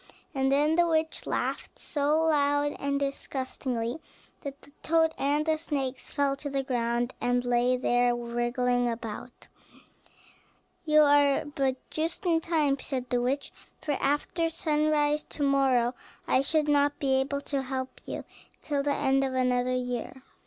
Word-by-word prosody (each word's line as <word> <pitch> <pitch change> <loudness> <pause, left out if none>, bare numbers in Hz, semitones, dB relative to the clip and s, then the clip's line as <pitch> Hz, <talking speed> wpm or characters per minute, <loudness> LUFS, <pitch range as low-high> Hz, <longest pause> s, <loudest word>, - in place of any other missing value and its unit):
And 270 -1 +1
then 300 +4 +3
the 345 0 +4
witch 320 -1 0
laughed - - -3
so 300 +2 +1
loud 290 -2 +2
and 280 0 -1
disgustingly, 260 -2 -3 0.4
that 280 0 -8
the - - -17
toad 320 0 +2
and 290 +2 +1
the 315 -1 +1
snakes 275 -5 -3
fell 280 -2 +1
to 285 +1 -4
the 275 -1 -1
ground, 240 -1 -1
and 245 0 +1
lay 245 +1 +2
there 245 -1 +2
wriggling 240 +1 0
about. 230 +1 -7 1.4
"You 305 -2 +5
are 285 -1 +4
but 275 -3 -1 0.2
just 325 +5 -3
in 330 -2 +3
time," 300 -5 +1
said 255 -2 -4
the 245 -1 +2
witch; 270 +3 -1 0.3
"for 300 - -3
after 295 +4 0
sunrise 300 -2 +1
to 290 - -5
morrow 265 -3 +3 0.3
I 260 - +4
should 305 +2 +1
not 290 0 +3
be 265 -2 +2
able 280 +1 -2
to 280 -1 -2
help 260 0 -5
you - - -5 0.4
till 290 -2 0
the 285 0 0
end 270 0 +2
of 265 -1 -2
another 250 0 +1
year. 250 +1 -4
275 Hz, 150 wpm, -28 LUFS, 250-295 Hz, 1.4 s, You